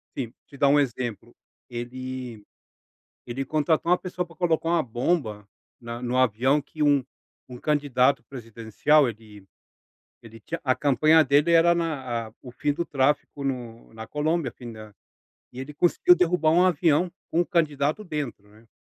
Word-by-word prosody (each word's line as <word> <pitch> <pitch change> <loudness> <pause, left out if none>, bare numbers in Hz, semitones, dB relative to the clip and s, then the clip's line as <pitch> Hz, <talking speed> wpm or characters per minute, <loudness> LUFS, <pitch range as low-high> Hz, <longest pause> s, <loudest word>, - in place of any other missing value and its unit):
assim, 120 -4 -4 0.2
te 140 - -14
dar 140 0 +3
um 145 +1 +5
exemplo, 120 -4 -3 0.3
ele 125 -1 -6 0.8
ele 130 +3 -4
contratou 155 +3 +1
uma 180 - +5
pessoa 180 0 -4
para 170 -1 -18
colocar 165 -1 0
uma 170 -1 +3
bomba 120 - -2 0.3
na 115 0 -7
no 125 +1 -1
avião 130 +4 +2
que 150 +2 -4
um 145 -3 +3 0.4
um 125 - -9
candidato 140 -2 +1
presidencial 120 +4 +1
ele 105 -3 -12 0.8
ele 115 0 -13
tinha 165 +10 -6
a 130 - +3
campanha 155 +3 +4
dele 145 +4 +3
era 170 +1 +5
na 130 -9 -3
a - - -14
o 125 - -10
fim 145 +4 -1
do 170 +4 -2
tráfico 140 +1 0
no 120 -5 -5
na 110 0 -9
Colômbia, 150 -2 -1
o - - -32
fim 120 -2 -9
da 110 -1 -11 0.6
e 125 - -8
ele 135 +3 -7
conseguiu 175 +3 +4
derrubar 175 -3 +2
um 175 +2 +5
avião 170 0 +2 0.2
com 170 - +2
o 175 - +1
candidato 155 +1 0
dentro, 145 - -5
né. 110 +2 -21
140 Hz, 165 wpm, -25 LUFS, 120-155 Hz, 0.8 s, um